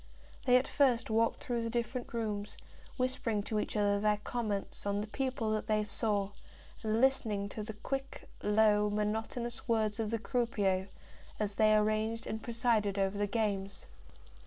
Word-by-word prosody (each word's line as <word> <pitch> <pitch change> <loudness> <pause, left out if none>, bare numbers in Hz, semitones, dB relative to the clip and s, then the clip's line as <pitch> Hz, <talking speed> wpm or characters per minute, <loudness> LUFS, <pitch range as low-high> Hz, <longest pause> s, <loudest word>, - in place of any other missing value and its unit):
They 250 0 +7
at 255 - 0
first 250 -5 +2
walked 225 +1 +2
through 240 -4 -1
the 230 - -2
different 240 +1 -2
rooms, 210 -3 -3 0.4
whispering 250 -5 0
to 215 +1 -1
each 210 - -2
other 205 -1 +3
their 210 0 +2
comments 210 -4 -3
on 200 0 +1
the 210 - -2
people 250 -1 -2
that 215 0 -1
they 215 -1 +2
saw, 205 -2 0 0.5
and 220 0 +1
listening 220 -6 +2
to 215 - -5
the 215 +1 -5
quick, 270 +5 -5
low, 210 0 +4
monotonous 220 +4 -2
words 220 -2 +1
of 220 -2 0
the 230 - 0
croupiers 205 -5 0 0.5
as 210 -1 0
they 215 +1 +5
arranged 215 +1 +1
and 220 - -4
presided 225 -4 +1
over 195 0 +1
the 205 - +1
games. 200 -2 -2
215 Hz, 160 wpm, -33 LUFS, 205-235 Hz, 0.5 s, They